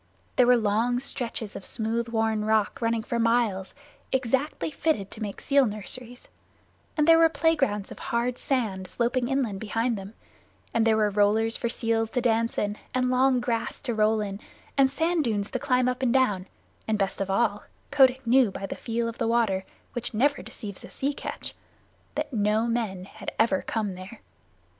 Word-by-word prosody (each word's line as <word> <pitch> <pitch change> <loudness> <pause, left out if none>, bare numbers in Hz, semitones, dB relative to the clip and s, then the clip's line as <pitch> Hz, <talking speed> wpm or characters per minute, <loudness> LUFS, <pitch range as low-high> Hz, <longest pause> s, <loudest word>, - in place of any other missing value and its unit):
There 250 - +5
were 250 0 +6
long 230 +3 +1
stretches 235 -5 -4
of - - -7
smooth 230 +2 -2
worn 220 -2 0
rock 215 0 +1
running 230 -1 +1
for 235 0 -2
miles, 230 -5 +1 0.4
exactly 265 +5 0
fitted 280 -10 -1
to 220 - -9
make 205 -2 -4
seal 280 -2 +3
nurseries, 235 +4 -6 0.7
and 300 0 +3
there 330 0 +8
were 330 0 +6
play 325 0 +2
grounds 210 -9 -1
of - - -9
hard 240 +1 -1
sand 210 -9 -1
sloping 245 +3 0
inland 250 -7 -1
behind 225 +1 -1
them, 195 +3 -10 0.6
and 230 0 +3
there 220 -1 +4
were 210 -1 +2
rollers 215 +3 +3
for 235 - -2
seals 225 -1 0
to 250 - -1
dance 230 -1 +1
in, 205 0 -1 0.2
and 255 0 +2
long 255 0 +4
grass 235 -2 -2
to 250 -4 -2
roll 215 0 +2
in, 200 -1 -4 0.4
and 275 -1 +5
sand 325 +2 +1
dunes 210 -5 -1
to 255 - -2
climb 255 -2 +2
up 255 0 -1
and 250 -2 +2
down, 205 -8 +2 0.4
and, 220 -1 +1
best 195 -1 -1
of 195 - -2
all, 205 +1 +1 0.3
Kotick 265 -2 +4
knew 245 0 +5
by 195 - -5
the - - -5
feel 230 0 -2
of 230 - -6
the - - +1
water, 220 -5 +1 0.3
which 240 -2 -3
never 285 +6 +2
deceives 200 -3 -8
a - - -8
true - - -16
sea 280 +2 0
catch, - - -6 0.6
that 300 -2 -3
no 215 +1 +2
men 220 -6 -2
had - - -7
ever 220 -4 +3
come 215 -4 -2
there. 185 +5 -10
230 Hz, 190 wpm, -26 LUFS, 210-255 Hz, 0.7 s, there